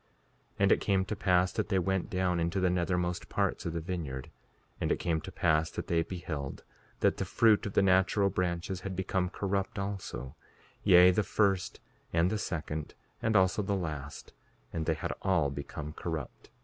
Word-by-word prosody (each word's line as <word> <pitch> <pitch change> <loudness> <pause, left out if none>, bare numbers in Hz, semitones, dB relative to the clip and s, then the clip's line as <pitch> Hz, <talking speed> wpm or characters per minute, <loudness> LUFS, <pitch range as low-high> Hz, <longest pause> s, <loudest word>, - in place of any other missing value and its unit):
5:39 - - -37
And 100 - +5
it - - +4
came 95 -2 +2
to 110 - -3
pass 90 -2 +2
that - - -2
they 95 - +2
went 95 0 0
down 90 -2 0
into 85 +3 0
the 90 -1 +2
nethermost 90 0 -1
parts - - -1
of 85 - -3
the 85 - -1
vineyard. 80 -7 -5 0.5
And - - 0
it - - +2
came 80 -2 -1
to - - -8
pass 80 +1 +2
that - - -5
they 85 -1 +1
beheld 80 -6 -5 0.4
that - - +3
the - - -1
fruit 110 -2 +3
of 100 - -6
the - - +4
natural 95 +1 +3
branches 90 0 -2
had 95 0 -5
become 95 0 0
corrupt 100 +2 -2
also; 100 -9 -5 0.5
yea, 90 -2 +8
the 100 - +2
first 100 -3 0 0.3
and 85 +3 +2
the 110 - -1
second 80 -5 -4 0.3
and 110 -1 +1
also 95 +2 +4
the 100 0 -1
last; 75 -6 -5 0.4
and 80 -2 -2
they 80 - +2
had - - -3
all 85 -7 +2
become 75 +2 -6
corrupt. 80 -5 -6
90 Hz, 190 wpm, -31 LUFS, 80-95 Hz, 0.5 s, yea